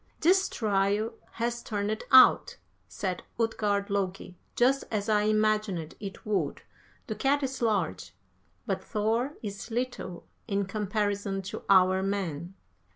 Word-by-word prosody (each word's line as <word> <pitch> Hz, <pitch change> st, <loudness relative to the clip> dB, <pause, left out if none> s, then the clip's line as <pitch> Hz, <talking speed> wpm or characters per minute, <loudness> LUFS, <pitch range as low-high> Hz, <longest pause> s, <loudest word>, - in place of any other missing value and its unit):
"'This 380 Hz, +4 st, +4 dB
trial 205 Hz, +1 st, 0 dB, 0.2 s
has 235 Hz, +1 st, -2 dB
turned 210 Hz, 0 st, -2 dB
out,' 260 Hz, 0 st, +7 dB, 0.3 s
said 185 Hz, -3 st, -3 dB, 0.2 s
Utgard 205 Hz, -3 st, 0 dB
Loki, 190 Hz, -2 st, -2 dB, 0.2 s
'just 265 Hz, +3 st, +3 dB
as 210 Hz, -1 st, -2 dB
I 210 Hz, -1 st, +3 dB
imagined 215 Hz, -6 st, +1 dB
it 195 Hz, -2 st, -8 dB
would; 210 Hz, -2 st, -1 dB, 0.4 s
the 220 Hz, -, -3 dB
cat 275 Hz, +6 st, +1 dB
is 265 Hz, -1 st, -3 dB
large, 180 Hz, -, -1 dB, 0.5 s
but 190 Hz, -1 st, -2 dB
Thor 225 Hz, +7 st, -1 dB
is 200 Hz, +2 st, -6 dB
little 235 Hz, -7 st, -4 dB, 0.2 s
in 200 Hz, 0 st, 0 dB
comparison 205 Hz, -1 st, -2 dB
to 190 Hz, -, -6 dB
our 185 Hz, -1 st, +5 dB
men.' 190 Hz, -3 st, -3 dB
205 Hz, 125 wpm, -28 LUFS, 195-225 Hz, 0.5 s, out